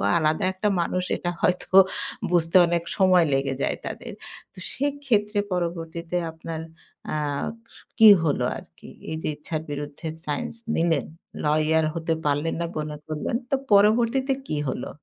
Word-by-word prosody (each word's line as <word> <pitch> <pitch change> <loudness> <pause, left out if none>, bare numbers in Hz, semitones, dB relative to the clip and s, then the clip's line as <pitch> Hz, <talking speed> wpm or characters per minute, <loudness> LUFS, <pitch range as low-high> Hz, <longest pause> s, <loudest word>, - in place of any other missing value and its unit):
ও - - -2 0.2
আলাদা 155 -1 +1
একটা 190 +3 -1
মানুষ 180 +2 -1
এটা 175 - -2
হয়তো 180 - +1 0.6
বুঝতে 170 0 +2
অনেক 170 0 0
সময় 185 -3 +5
লেগে 135 0 0
যায় - - 0
তাদের। - - -6 0.4
তো - - -18 0.2
সেক্ষেত্রে 255 -7 0
পরবর্তীতে 170 -1 -3
আপনার 160 0 -6 0.5
অ্যা 155 - -1 0.6
স - - -14 0.2
কি 220 -1 +10 0.2
হলো 140 -5 +1
আরকি? - - -13 0.2
এইযে 160 0 -3
ইচ্ছার 155 +1 -4
বিরুদ্ধে 145 +2 -6 0.2
সাইন্স 150 - -3 0.2
নিলেন, 165 -3 +1 0.4
লইয়ার 155 +1 +3
হতে 165 -1 -1
পারলেন 145 +2 0
না 170 - 0
মনে 150 0 -4
করলেন। 155 +8 -2
তো - - +2 0.2
পরবর্তীতে 230 +6 +4 0.2
কি 155 - -1
হলো? 125 - -5
165 Hz, 145 wpm, -25 LUFS, 155-190 Hz, 0.6 s, কি